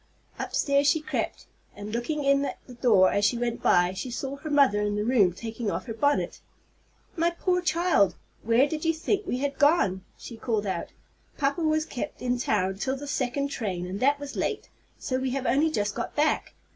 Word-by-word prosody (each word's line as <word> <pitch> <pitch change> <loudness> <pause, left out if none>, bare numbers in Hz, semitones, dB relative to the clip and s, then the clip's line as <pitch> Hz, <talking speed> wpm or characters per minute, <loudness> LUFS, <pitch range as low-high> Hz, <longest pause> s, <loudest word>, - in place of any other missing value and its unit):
Upstairs 280 0 +1
she 305 +2 +4
crept, 305 - -3 0.3
and, 205 +1 -7
looking 290 +6 -2
in 275 0 +3
at - - -4
the 250 - -12
door 220 -7 +4
as 200 - 0
she 225 +4 +3
went 235 0 -2
by, 175 +1 +3
she 220 +7 -5
saw 270 +3 -4
her 310 +2 -7
mother 275 -8 +4
in 205 0 -1
her 210 - 0
room 215 -6 +4
taking 225 +4 -5
off - - -3
her 230 - -5
bonnet. 285 +5 0 0.7
"My 335 0 +2
poor 360 +1 0
child, 315 - +2 0.3
where 235 +5 +3
did 310 0 -4
you 325 -1 +2
think 390 +4 -1
we 250 - -1
had 280 +1 -3
gone?" 285 - +3
she 235 - -9
called 220 -3 -1
out. 185 -3 -3 0.5
"Papa 285 +4 0
was 310 -1 +1
kept 250 - -6
in 245 0 -1
town 195 -5 0
till 265 +4 -1
the 290 - -7
second 280 0 -1
train, 190 -10 -3
and 185 +2 -5
that 285 +4 +3
was 285 0 -7
late, - - -2 0.3
so 255 0 -2
we 260 0 -1
have 270 -1 -2
only 290 +6 +3
just 205 -9 -1
got 235 - -5
back. 300 +1 0
260 Hz, 205 wpm, -27 LUFS, 210-290 Hz, 0.7 s, she